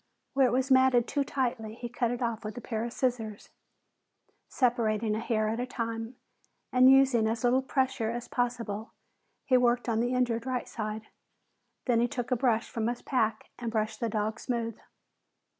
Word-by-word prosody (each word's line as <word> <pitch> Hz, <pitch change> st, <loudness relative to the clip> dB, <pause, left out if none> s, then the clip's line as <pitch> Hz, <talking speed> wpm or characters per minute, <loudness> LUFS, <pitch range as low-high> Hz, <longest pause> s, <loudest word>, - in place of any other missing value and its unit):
Where 270 Hz, -1 st, +4 dB
it -, -, 0 dB
was 260 Hz, +2 st, 0 dB
matted 260 Hz, -2 st, +5 dB
too 285 Hz, -, 0 dB
tightly, 240 Hz, -5 st, -2 dB
he 240 Hz, +1 st, -6 dB
cut 240 Hz, 0 st, -1 dB
it 245 Hz, +1 st, -2 dB
off 230 Hz, -2 st, -2 dB
with 215 Hz, +2 st, -6 dB
a -, -, -2 dB
pair 225 Hz, -2 st, -3 dB
of 235 Hz, -, -4 dB
scissors. 230 Hz, -5 st, -2 dB, 1.0 s
Separating 230 Hz, -4 st, +1 dB
a -, -, -1 dB
hair 220 Hz, -2 st, 0 dB
at 225 Hz, +2 st, -1 dB
a 250 Hz, -, -2 dB
time 230 Hz, -1 st, -4 dB, 0.6 s
and 255 Hz, +1 st, +7 dB
using 265 Hz, -4 st, +5 dB
as 225 Hz, +1 st, -2 dB
little 250 Hz, +2 st, +4 dB
pressure 265 Hz, -4 st, 0 dB
as 235 Hz, +1 st, -4 dB
possible, 230 Hz, -3 st, -2 dB, 0.5 s
he 255 Hz, -, +4 dB
worked 245 Hz, 0 st, +2 dB
on 225 Hz, -2 st, +1 dB
the 245 Hz, +2 st, 0 dB
injured 240 Hz, -1 st, 0 dB
right 255 Hz, -1 st, -2 dB
side. 215 Hz, -1 st, -5 dB, 0.8 s
Then 240 Hz, -3 st, +3 dB
he 240 Hz, -, +3 dB
took 245 Hz, +1 st, -4 dB
a -, -, +4 dB
brush 235 Hz, -2 st, +1 dB
from 225 Hz, -3 st, -2 dB
his 240 Hz, 0 st, -3 dB
pack 225 Hz, -5 st, -1 dB
and 235 Hz, -1 st, -3 dB
brushed 220 Hz, 0 st, -1 dB
the 230 Hz, -, -1 dB
dog 215 Hz, 0 st, -2 dB
smooth. 230 Hz, -3 st, -2 dB
235 Hz, 185 wpm, -29 LUFS, 225-250 Hz, 1.0 s, and